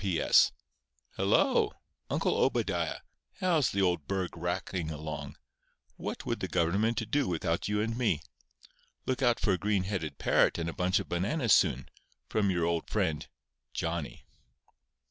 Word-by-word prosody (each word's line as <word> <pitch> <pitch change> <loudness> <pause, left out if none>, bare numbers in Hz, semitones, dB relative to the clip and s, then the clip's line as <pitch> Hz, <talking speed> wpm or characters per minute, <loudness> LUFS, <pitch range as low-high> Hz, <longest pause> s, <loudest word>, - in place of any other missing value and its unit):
P.S.—Hello! 65 -8 +1 0.4
Uncle - - +1
Obadiah. - - 0 0.3
How's 165 - +2
the 100 0 +1
old 90 -5 0
burg 95 -2 -2
racking 85 0 -3
along? 75 -1 -6 0.6
What - - -5
would - - -2
the - - -2
government 105 +6 0
do 145 -1 +2
without 85 -1 -1
you 105 0 +1
and 115 +1 -1
me? 110 -11 0 0.8
Look 130 0 -1
out 120 -2 +3
for 105 - +1
a 90 - -1
green 100 -2 +1
headed 95 -6 -3
parrot - - +3
and 85 -1 -2
a 85 - -3
bunch 90 +1 +1
of - - -5
bananas 105 - +1
soon, - - +3 0.4
from 105 -2 +1
your 85 -3 +1
old 85 -1 -1
friend 90 -8 -1 0.5
JOHNNY. 85 -3 -3
90 Hz, 145 wpm, -30 LUFS, 85-105 Hz, 0.8 s, out